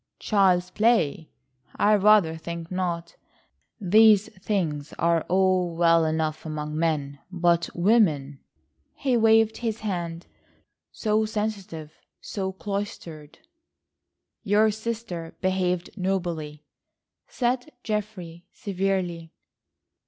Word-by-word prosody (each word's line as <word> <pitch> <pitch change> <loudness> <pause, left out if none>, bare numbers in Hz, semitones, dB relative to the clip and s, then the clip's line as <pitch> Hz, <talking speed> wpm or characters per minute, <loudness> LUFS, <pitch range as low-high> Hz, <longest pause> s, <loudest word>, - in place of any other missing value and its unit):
"Child's 185 -4 +2
play! 210 -9 +1 0.5
I 210 - +3
rather 205 -5 +4
think 170 +1 -7
not. 175 -2 -3 0.6
These 210 +1 +5
things 160 -8 -2
are 170 0 +2
all 185 -2 +2
well 165 -1 +4
enough 155 0 -1
among 150 -1 -5
men, 150 -3 -1
but 175 -1 +1
women!" 170 - +2 0.6
he 265 -3 0
waved 225 -1 +4
his 225 -2 -3
hand; 175 -5 -4 0.7
"so 215 0 0
sensitive, 200 -8 -4 0.3
so 190 -2 -4
cloistered!" 190 -6 -6 1.0
"Your 215 0 +3
sister 220 -6 -5
behaved 185 -1 -1
nobly," 170 -6 -3 0.6
said 250 +3 -1
Geoffrey 200 -6 -5
severely. 185 -5 -2
185 Hz, 95 wpm, -25 LUFS, 165-210 Hz, 1.0 s, These